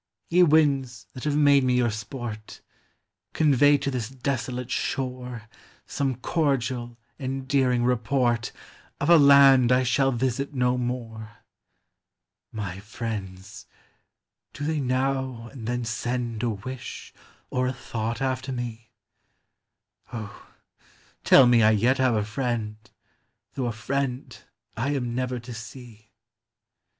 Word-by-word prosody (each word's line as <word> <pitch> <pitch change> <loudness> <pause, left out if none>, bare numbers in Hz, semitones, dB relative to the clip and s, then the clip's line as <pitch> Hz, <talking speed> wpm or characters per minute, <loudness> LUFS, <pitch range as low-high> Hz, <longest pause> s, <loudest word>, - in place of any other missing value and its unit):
Ye 180 +2 +5
winds 145 -6 +3
that 130 - -8
have 150 -1 +1
made 140 -2 +5
me 125 -1 +2
your 120 -2 +2
sport, 110 0 -7 0.7
Convey 145 -1 +4
to 140 - -3
this 120 -3 -3
desolate 125 -1 -3
shore 125 -3 -3 0.4
Some 135 -2 -2
cordial, 125 -5 -1 0.2
endearing 130 -2 0
report 120 0 +1 0.5
Of 145 +4 +1
a 170 - +8
land 140 -3 +7
I 125 +1 +4
shall 135 +2 +2
visit 130 +3 -2
no 125 -1 +2
more! 115 -3 -5 1.2
My 100 -4 -5
friends, 105 -2 -7 0.4
— - - -58
do 145 - -7
they 155 0 0
now 130 -2 -1
and 120 -5 -8
then 120 0 -2
send 120 0 -3
A 120 - 0
wish 115 +4 -7 0.4
or 125 0 0
a 130 - -1
thought 115 -1 -4
after 130 0 -2
me? 120 -3 -6 1.2
O, 110 -4 -8 0.8
tell 135 - +7
me 120 -1 +5
I 110 - +6
yet 120 +5 +2
have 130 -3 +3
a 105 -1 0
friend, 110 -1 -2 0.8
Though 130 -3 -2
a - - -1
friend 130 +3 -3 0.4
I 135 +6 -1
am 125 -3 -2
never 125 0 -2
to 120 0 -9
see. 115 -1 -11
125 Hz, 125 wpm, -25 LUFS, 115-135 Hz, 1.2 s, a